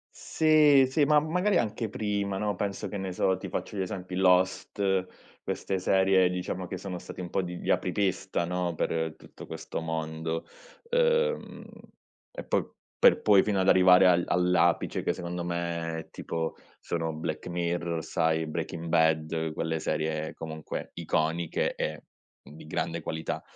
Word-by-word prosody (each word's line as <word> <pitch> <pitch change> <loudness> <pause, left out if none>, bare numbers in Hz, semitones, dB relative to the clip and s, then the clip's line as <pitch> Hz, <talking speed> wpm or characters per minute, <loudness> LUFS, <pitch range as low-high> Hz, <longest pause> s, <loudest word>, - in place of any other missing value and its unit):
Sì, 150 -4 +5
sì, 145 +3 +3
ma 150 +1 +5
magari 180 +6 +1
anche 110 0 -1
prima, 100 -1 -2
no, 105 -1 -1
penso, 100 +1 -3
che 100 - -6
ne 95 -1 -4
so, 95 +1 +1
ti - - -7
faccio - - -4
gli 95 - 0
esempi 90 -1 -5
Lost, 95 +1 +2 0.4
queste 95 -1 -2
serie 95 0 +4
diciamo 90 0 -3
che 90 +1 -5
sono 95 -1 -5
stati 95 - -9
un 90 -1 -6
po' - - 0
di 90 -1 -5
gli - - -2
apripista, 95 -2 0
no, 90 0 -2
per 80 0 -1
tutto - - -13
questo - - -5
mondo. 80 0 -3 0.5
Uhm, 480 -1 +1 0.7
e - - -6
poi - - 0 0.3
per - - +5
poi 100 -2 +6
fino 100 -3 +1
ad 95 - +1
arrivare 95 0 +7
al 90 -1 +4
all'apice 90 -1 +2
che - - +2
secondo 85 0 -5
me, 85 -2 -3
tipo, 80 -1 -4 0.2
sono 80 -1 -2
Black 80 0 -4
Mirror, 85 -1 -2
sai, 80 -1 0
Breaking 85 +2 -4
Bad, 80 -1 +1
quelle 80 0 -1
serie 80 0 -2
comunque 80 -1 -6
iconiche 80 +1 -1
e 75 0 -3 0.4
di 75 +1 -13
grande 80 +1 -2
qualità. 80 0 -4
90 Hz, 155 wpm, -28 LUFS, 80-95 Hz, 0.7 s, arrivare